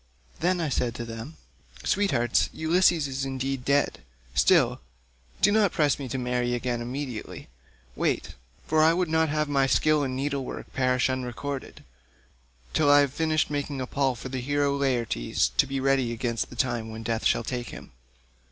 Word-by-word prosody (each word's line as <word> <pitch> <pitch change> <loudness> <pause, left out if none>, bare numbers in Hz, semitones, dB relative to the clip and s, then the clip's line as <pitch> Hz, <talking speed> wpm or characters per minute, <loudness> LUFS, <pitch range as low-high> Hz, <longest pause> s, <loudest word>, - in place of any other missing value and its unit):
Then 180 +2 +1
I 160 -3 -1
said 120 -3 -1
to 120 - -5
them, 115 +7 -8 0.5
'Sweethearts, 140 -12 +2
Ulysses 165 -1 +3
is 135 0 -3
indeed 135 -1 -3
dead, 140 +2 +1 0.3
still, 65 -1 +3 0.6
do 205 - +6
not 205 -3 +3
press 145 -4 +1
me 135 -3 -5
to 130 - -2
marry 125 -1 0
again 120 -1 -2
immediately; 125 -1 -6 0.5
wait—for 60 - -2
I 160 +1 +5
would 180 -2 0
not 160 0 +2
have 150 0 0
my 140 -2 +2
skill 155 +2 +3
in 130 -2 -2
needlework 140 0 -4
perish 130 -1 +2
unrecorded—till 65 - -5
I 145 0 +7
have 140 -2 0
finished 155 0 0
making 145 -1 -3
a 130 - -2
pall 135 0 0
for 125 +2 -7
the 130 -1 -3
hero 145 +1 +1
Laertes, 125 - 0
to - - +2
be 135 0 -2
ready 135 -2 +2
against 115 0 -2
the - - -11
time 120 -3 -1
when 110 0 -7
death 115 0 0
shall - - +1
take 120 0 -4
him. - - -10
130 Hz, 165 wpm, -26 LUFS, 120-145 Hz, 0.6 s, I